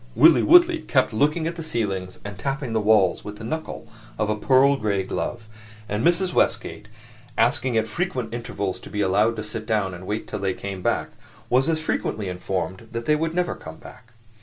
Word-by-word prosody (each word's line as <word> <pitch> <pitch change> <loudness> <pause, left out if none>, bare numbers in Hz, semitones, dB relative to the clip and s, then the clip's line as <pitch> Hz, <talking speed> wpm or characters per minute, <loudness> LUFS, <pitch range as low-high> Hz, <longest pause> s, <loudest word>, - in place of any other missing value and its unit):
Willie - - +7
Woodley 350 0 +6
kept 130 - +1
looking 150 +8 +1
at 170 +1 -3
the - - -4
ceilings 100 - -3
and 100 0 -6
tapping 135 - -3
the 110 - +1
walls 105 -3 +3
with 105 - -7
the - - -10
knuckle 160 +8 -5 0.3
of 105 0 0
a - - +1
pearl 135 +5 +4
gray 100 -5 -1
glove; 110 +4 -4 0.4
and 105 +2 -2
Mrs. 175 +1 +2
Westgate, 105 - 0 0.5
asking 125 +1 +2
at 110 - +2
frequent 125 - -3
intervals 100 -5 -3
to - - -11
be 105 - -2
allowed 105 +4 +2
to 110 - -4
sit 110 0 -6
down 105 -4 0
and 90 +1 -9
wait 105 +1 -2
till 105 - -5
they 95 -1 -1
came 100 -2 -6
back, - - 0 0.4
was 130 +5 +3
as 160 -1 +1
frequently 110 -9 -2
informed 95 +3 -4
that 115 0 -4
they 150 - +3
would 165 +2 -2
never 180 -1 0
come 80 0 -10
back. 120 -1 -15
110 Hz, 200 wpm, -24 LUFS, 100-140 Hz, 0.5 s, Willie